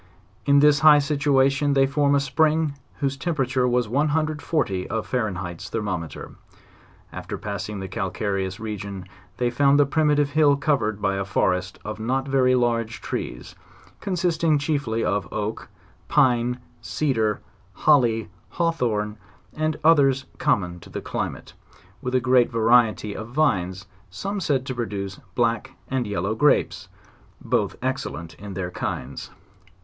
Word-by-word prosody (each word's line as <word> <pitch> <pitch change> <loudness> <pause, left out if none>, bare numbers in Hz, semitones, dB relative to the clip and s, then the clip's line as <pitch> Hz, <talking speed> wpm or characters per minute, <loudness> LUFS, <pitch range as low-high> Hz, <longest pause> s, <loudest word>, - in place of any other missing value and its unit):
In 140 0 +6
this 145 0 +5
high 155 -1 +8
situation 140 -1 +2
they 135 -1 +4
found 140 +1 +2
a - - +4
spring 155 +2 +1 0.3
whose 140 -1 0
temperature 135 -4 0
was 125 -2 +1
140 150 - 0
of 110 0 -2
Fahrenheit's 90 -8 -3
thermometer* 95 -7 -4 0.8
After - - -6
passing 105 -1 -5
the 95 - -5
calcareous 95 0 -3
region 100 -3 -6 0.3
they 120 -1 0
found 140 +3 +4
the 145 - +6
primatrve 145 0 +2
hill 145 -1 +4
covered 115 -9 0
by 95 0 +1
a 100 - -1
forest 90 -1 0
of 105 +1 -5
not 130 +4 -1
very 130 -2 +3
large 115 -2 0
trees, - - -5 0.5
consisting 170 -4 +1
chiefly 140 -6 -1
of 100 -1 -1
oak, 110 +1 -4 0.4
pine, 125 -3 +3 0.2
cedar, 115 -8 0 0.3
holly, 120 -5 +3 0.2
hawthorn, 120 -11 -1 0.4
and 155 0 -1
others 140 -5 +4
common 90 -2 0
to - - -14
the - - -5
climate, - - -5 0.5
with 125 -1 -2
a - - +5
great, 125 -1 +3
variety 115 -2 +3
of 110 - -6
vines, 95 -9 0 0.2
some 195 - -4
said 140 -7 0
to 130 - -3
produce 100 -5 -4 0.2
black 115 -2 0
and 130 -3 -1
yellow 100 +1 -1
grapes, 145 +6 +2 0.5
both - - 0
excellent 80 +1 -3
in 100 -2 -8
their 90 -1 -3
kinds. 70 -6 -5
125 Hz, 135 wpm, -24 LUFS, 105-145 Hz, 0.8 s, high